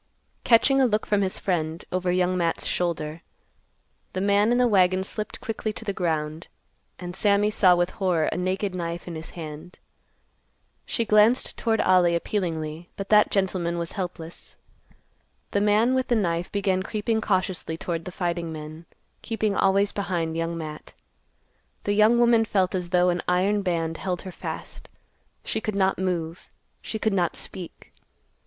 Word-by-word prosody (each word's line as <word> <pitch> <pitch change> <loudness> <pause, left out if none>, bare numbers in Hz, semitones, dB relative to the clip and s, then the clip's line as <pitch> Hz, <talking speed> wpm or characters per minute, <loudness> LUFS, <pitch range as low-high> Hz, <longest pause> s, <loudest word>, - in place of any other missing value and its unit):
Catching 270 +3 +5
a 260 - +5
look 215 -1 0
from 205 -1 +1
his 190 -1 -1
friend, 165 -3 -2
over 185 0 0
Young 180 0 +1
Matt's 170 -2 0
shoulder, 165 -2 -2 0.9
the 185 - -2
man 205 +3 +3
in 245 - +3
the 250 0 +4
wagon 185 -3 +3
slipped 210 +2 -5
quickly 220 -1 -3
to 225 - -8
the 200 - -1
ground, 160 -3 -2 0.5
and 180 -1 -7
Sammy 205 +1 +3
saw 185 -4 +5
with 175 +1 +1
horror 180 -5 0
a - - -1
naked 185 +2 -1
knife 170 -1 -4
in 175 - -5
his 160 0 -7
hand. 160 +2 -8 1.1
She 230 - -1
glanced 215 +4 +4
toward 225 -2 +1
Ollie 180 -2 +4
appealingly, 165 -3 -3
but 195 0 -6
that 210 0 +6
gentleman 185 -3 0
was 170 -1 -3
helpless. 175 -3 -6 1.0
The 200 - +1
man 210 +4 +3
with 260 0 +1
the 240 - +2
knife 175 -5 -1
began 195 -2 +1
creeping 220 +2 -1
cautiously 185 -5 -1
toward 165 -1 -4
the 180 - -6
fighting 175 -2 -2
men, 155 +1 -8 0.4
keeping 215 -2 -1
always 195 +1 +3
behind 175 -5 -2
Young 165 0 -2
Matt. 155 -2 -7 0.9
The 205 - 0
young 215 +3 +5
woman 235 -1 +5
felt 190 -4 +1
as 180 -2 -2
though 180 0 +3
an 175 0 0
iron 195 +3 +2
band 165 -3 -1
held 180 -2 -3
her 185 - -7
fast. - - -7 0.6
She 220 - -1
could 215 -1 -3
not 190 -1 +2
move. 175 -2 -3 0.3
She 220 - -4
could 220 -1 0
not 175 -3 +1
speak. 180 -3 -8
185 Hz, 165 wpm, -25 LUFS, 170-205 Hz, 1.1 s, that